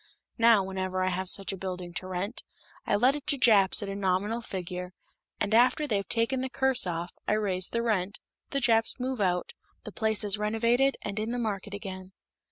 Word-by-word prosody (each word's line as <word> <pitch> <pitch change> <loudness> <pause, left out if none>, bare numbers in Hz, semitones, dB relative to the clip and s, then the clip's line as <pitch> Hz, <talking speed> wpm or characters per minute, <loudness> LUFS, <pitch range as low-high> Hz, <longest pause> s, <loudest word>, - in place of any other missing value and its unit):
Now, 230 -3 +6
whenever 185 -1 -2
I 185 - +2
have 185 0 -2
such 195 -1 0
a - - -6
building 180 -2 -5
to 185 - -5
rent, 185 +5 -4 0.4
I - - +3
let 250 +7 +4
it 295 0 -8
to 290 -2 +1
Japs 210 -6 +5
at - - -4
a 195 - -4
nominal 200 +4 0
figure, 180 -3 -6 0.5
and 205 +1 -1
after 250 +6 +4
they've 200 -8 -1
taken 240 +3 0
the 260 - -3
curse 265 -5 +1
off, 175 +1 -3 0.2
I - - +2
raise 190 -4 0
the 235 0 -1
rent, 205 -4 0 0.3
the 275 - -1
Japs 230 -1 +2
move 255 -2 -2
out, 180 -2 0 0.3
the - - -8
place 220 -2 +1
is 205 0 +1
renovated, 230 +5 +2
and 205 0 -3
in 215 +1 -2
the 245 - -2
market 205 -3 -3
again." 190 -1 -8
205 Hz, 200 wpm, -28 LUFS, 185-235 Hz, 0.5 s, Now